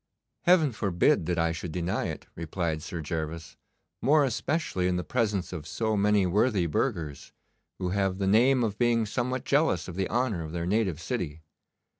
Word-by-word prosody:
'Heaven 175 -6 +5
forbid 95 -6 +1
that 90 -1 0
I 85 0 +2
should 85 +1 -5
deny 90 +2 -1
it,' - - -6
replied 80 -1 -3
Sir 80 +1 -5
Gervas, 80 +1 -4 0.5
'more 145 +4 +4
especially 130 - -1
in 90 - +1
the 90 - -1
presence 105 -7 -1
of 80 -4 -6
so 110 +5 -1
many 105 -1 +3
worthy 100 +1 +2
burghers, 80 - -2 0.4
who 90 - -2
have 95 0 0
the 100 - -1
name 120 +6 +4
of 105 -3 -2
being 120 -2 +3
somewhat 125 +4 -2
jealous 140 - +2
of 90 - -6
the 95 0 -1
honour 115 -8 0
of 80 0 -7
their 85 -1 -2
native 95 -4 0
city. 80 -5 -4
95 Hz, 175 wpm, -28 LUFS, 85-115 Hz, 0.5 s, Heaven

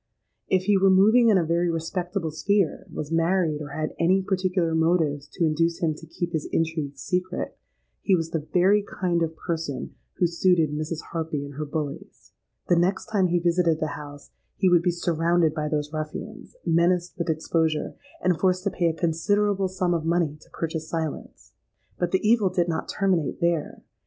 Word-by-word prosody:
If 185 -1 +2
he 200 0 +3
were 195 0 +5
moving 220 +5 +6
in 205 - +5
a 175 - +1
very 170 +2 +1
respectable 170 +1 -2
sphere, 195 +3 0
was 150 +1 -5
married, 165 -2 +1
or 150 - -5
had 155 +2 -3
any 185 +3 +3
particular 185 -3 0
motives 160 -3 +1
to 170 - +1
induce 165 +2 +1
him 160 -2 0
to 160 +2 -12
keep 170 +2 -4
his 155 -2 -2
intrigue 160 -4 -1
secret, 180 +4 -3 0.5
he 195 - +3
was 165 -2 -2
the 155 -2 -3
very 195 +3 +4
kind 180 -4 -1
of 165 -1 -1
person 160 -6 -4 0.2
who 180 - +1
suited 170 -2 +2
Mrs. 155 +2 -3
Harpy 160 -3 -3
and 140 - -9
her 150 +2 -4
bullies. 145 -1 -6 0.4
The 175 - +4
next 190 +5 0
time 195 -4 +3
he 175 0 +1
visited 170 -2 +2
the 155 - -1
house, 145 -1 -10 0.2
he 190 - +3
would 175 -2 +5
be 180 - +1
surrounded 170 -1 +1
by 155 -1 -2
those 150 0 -2
ruffians, 155 -1 -6
menaced 175 +1 +2
with 170 - -2
exposure, 160 0 0 0.3
and 180 -2 +2
forced 185 -1 +2
to 200 - 0
pay 175 - 0
a 165 - +1
considerable 190 +5 +1
sum 185 -1 -1
of 165 -2 -1
money 165 -2 +1
to - - -19
purchase 160 -1 -4
silence. 160 -3 -5 0.5
But 175 - +1
the 190 +3 +1
evil 220 -4 +4
did 180 -1 0
not 165 -2 -3
terminate 185 -7 0
there. 170 -3 -1
170 Hz, 185 wpm, -25 LUFS, 160-185 Hz, 0.5 s, moving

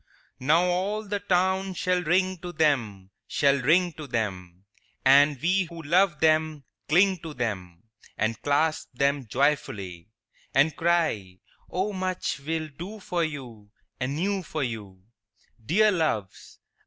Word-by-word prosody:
II 130 - -8
Now 165 +4 +5
all 195 +4 -1
the 205 0 -2
town 190 0 +1
shall 180 0 +1
ring 185 +2 +1
to 175 +1 -6
them, 115 - 0 0.2
Shall 140 -2 +2
ring 170 +6 +3
to 155 -1 -9
them, 95 -6 -4 0.4
And 140 +1 +6
we 185 +5 +2
who 165 -1 -10
love 170 +1 +3
them 155 -2 +2 0.3
cling 185 +3 +4
to 160 -2 -8
them 95 -7 -4 0.3
And 110 +1 -1
clasp 155 +1 0
them 140 -1 0
joyfully; 110 - -1 0.5
And 145 +2 +4
cry, 160 - 0 0.3
"O 195 +3 -2
much 185 -5 -2
we'll 155 +2 -3
do 180 +9 -8
for 175 -3 -1
you 125 -9 -6 0.3
Anew 170 +10 -1
for 155 -4 -4
you, 105 -6 -6 0.6
Dear 210 - +4
Loves! 155 - -2
155 Hz, 135 wpm, -26 LUFS, 120-180 Hz, 0.6 s, And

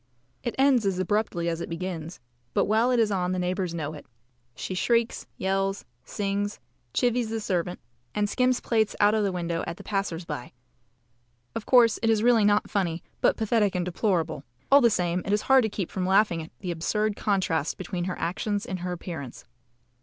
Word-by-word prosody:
It 240 - -3
ends 265 -3 +4
as 190 -2 0
abruptly 185 -2 0
as 170 0 -1
it - - -5
begins, 165 -1 -5 0.4
but - - +3
while 220 +4 +3
it 250 -2 +3
is 220 -2 +3
on 185 -2 0
the - - -1
neighbours 180 -1 -1
know 155 -2 -3
it. 150 - -11 0.5
She - - -5
shrieks, 230 +5 +1
yells, 195 +1 -1 0.2
sings, 200 +6 -2 0.3
chivies 245 - +1
the 225 0 -2
servant, 180 -4 -2 0.4
and 210 0 +1
skims 250 +4 +1
plates 220 -3 +1
out 205 0 +5
of 215 -1 +2
the 200 - +1
window 170 -2 -2
at 170 - -4
the - - -11
passers 195 -4 -2
by. 150 -6 -6 1.0
Of 215 - -5
course, 240 -3 +5
it 225 - +2
is 220 -1 +3
really 235 -2 +5
not 205 0 +3
funny, 175 -5 -1 0.2
but - - +3
pathetic 215 -3 +1
and 180 -1 0
deplorable 170 -5 -1 0.3
all 280 +1 +8
the 235 - +6
same, 180 -3 0
it 200 - -1
is 210 - +1
hard 265 -1 +6
to - - 0
keep 195 -4 -4
from 185 -1 -2
laughing 190 -3 +3
at 160 - -10
the 180 -3 -3
absurd 210 +6 0
contrast 180 -8 0
between 180 -1 -4
her 185 - -3
actions 200 +5 -2
and 185 - -4
her 180 +1 -3
appearance. 160 -7 -7
195 Hz, 195 wpm, -26 LUFS, 175-215 Hz, 1.0 s, all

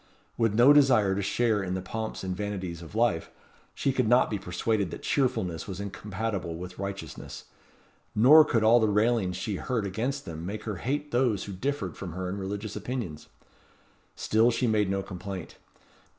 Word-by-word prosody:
With 115 -3 +1
no 125 +5 +7
desire 125 -9 +5
to 100 - -1
share 110 +1 +1
in 95 -1 -2
the - - -2
pomps 110 +1 -5
and 95 -1 -2
vanities 95 -4 -4
of 85 +4 -11
life, 115 -8 +1 0.5
she 135 - 0
could 125 -3 +1
not 120 +1 +4
be 105 - -1
persuaded 95 +2 -1
that - - -8
cheerfulness 95 - 0
was 95 -2 -6
incompatible 100 -3 -4
with 90 +2 -8
righteousness; 100 0 -6 0.7
nor 145 +9 +8
could 115 -7 +1
all 115 +2 +6
the 110 - +3
railings 105 -3 +1
she 95 +2 -3
heard 115 -2 -2
against 125 +8 -2
them 80 -1 -7
make 105 +4 -5
her 105 -4 -4
hate 145 - -3
those 120 -5 +1
who 100 - -7
differed 100 - -3
from 90 -4 -7
her 90 +1 -4
in 100 +2 -4
religious 100 +2 -5
opinions. 105 - -5 0.9
Still 110 +2 +3
she 120 +1 0
made 105 -4 +2
no 95 0 -1
complaint. 95 -1 -7
105 Hz, 180 wpm, -28 LUFS, 95-120 Hz, 0.9 s, nor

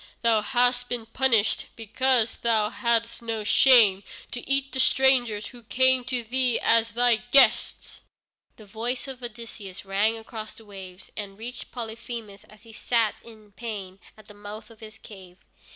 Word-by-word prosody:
Thou 225 -2 +3
hast 245 +2 +1
been 240 -2 -3
punished 230 -2 +1
because 235 +1 0
thou 220 -2 +1
hadst 235 -1 0
no 225 -2 -4
shame 215 -4 +5 0.3
to 245 - -5
eat 275 0 +2
the 265 - -3
strangers 250 -5 +3
who 245 -2 -14
came 260 +2 +2
to 250 -1 -2
thee 250 +1 0
as 230 0 +3
thy 240 0 +3
guests!" 245 +4 +2 0.5
The 215 - -15
voice 230 +6 -5
of 260 -2 -8
Odysseus 220 -5 -9
rang 205 +4 +1
across 220 -1 -9
the 225 - -15
waves, 190 -2 -11
and 200 -2 -7
reached 240 +3 -8
Polyphemus 225 -3 -8
as 215 - -19
he 225 -1 -15
sat 225 -1 0
in 215 -3 -16
pain 200 -4 -7 0.2
at 215 -1 -17
the 210 - -13
mouth 205 +2 -10
of 225 - -17
his 220 0 -12
cave. 185 -5 -14
230 Hz, 160 wpm, -25 LUFS, 210-245 Hz, 0.5 s, shame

